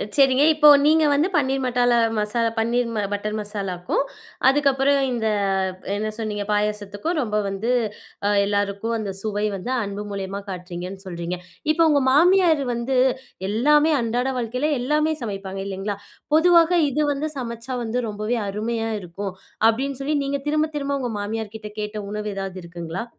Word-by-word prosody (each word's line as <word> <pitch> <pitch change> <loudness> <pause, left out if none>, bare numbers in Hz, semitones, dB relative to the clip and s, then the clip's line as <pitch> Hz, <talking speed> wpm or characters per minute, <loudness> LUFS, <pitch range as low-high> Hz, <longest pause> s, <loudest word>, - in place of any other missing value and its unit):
அ - - -1
சரிங்க. 270 0 +5
இப்போ, 300 -1 +6 0.2
நீங்க 315 0 +5
வந்து 300 +6 +3
பன்னீர் 270 -1 +1
மசாலா 245 -1 +3 0.2
மசாலா. 230 +2 +1
பன்னீர் 235 +2 +1 0.2
பட்டர் 210 +1 -2
மசாலாக்கும், 195 -1 -2 0.5
அதுக்கப்புறம் 275 0 +3
இந்த 230 -2 -1 0.7
என்ன 215 +1 -2
சொன்னீங்க? 210 -2 -3
பாயாசத்துக்கும் 210 - -1
ரொம்ப 215 -5 -1
வந்து 195 +5 -2 0.6
அ - - +3 0.2
எல்லாருக்கும் 205 +2 -1
அந்த 205 -2 -3
சுவை 210 -1 -1
வந்து 195 +7 -5
அன்பு 200 +1 -5
மூலியமா 195 0 -4
காட்றீங்கன்னு 180 +1 -7
சொல்றீங்க. 175 0 -4 0.4
இப்போ 330 - +2
உங்க 285 -2 +3
மாமியாரு 335 -1 +5
வந்து 245 +3 -1 0.5
எல்லாமே 295 +8 +4
அன்றாட 240 +3 0
வாழ்க்கைல 250 +6 -1
எல்லாமே 300 +4 +1
சமைப்பாங்க, 195 -3 -5
இல்லைங்களா? 195 +1 -3 0.4
பொதுவா, 340 +1 +7 0.3
"இது 300 +3 0
வந்து 285 +2 -2
சமைச்சா 235 0 -5
வந்து, 230 +2 -2
ரொம்பவே 215 +3 -2
அருமையா 225 +2 -2
இருக்கும்" 190 +2 -6 0.4
அப்படின்னு 265 +4 -1
சொல்லி 295 +2 0
நீங்க 280 0 -2
திரும்ப-திரும்ப 295 -2 0
உங்கள் 240 -4 -3
மாமியார்கிட்ட 215 0 -5
கேட்ட 210 0 -4
உணவு 210 0 -3
ஏதாவது 195 -1 -4
இருக்குங்களா? 170 +4 -5
225 Hz, 140 wpm, -23 LUFS, 205-275 Hz, 0.7 s, பொதுவா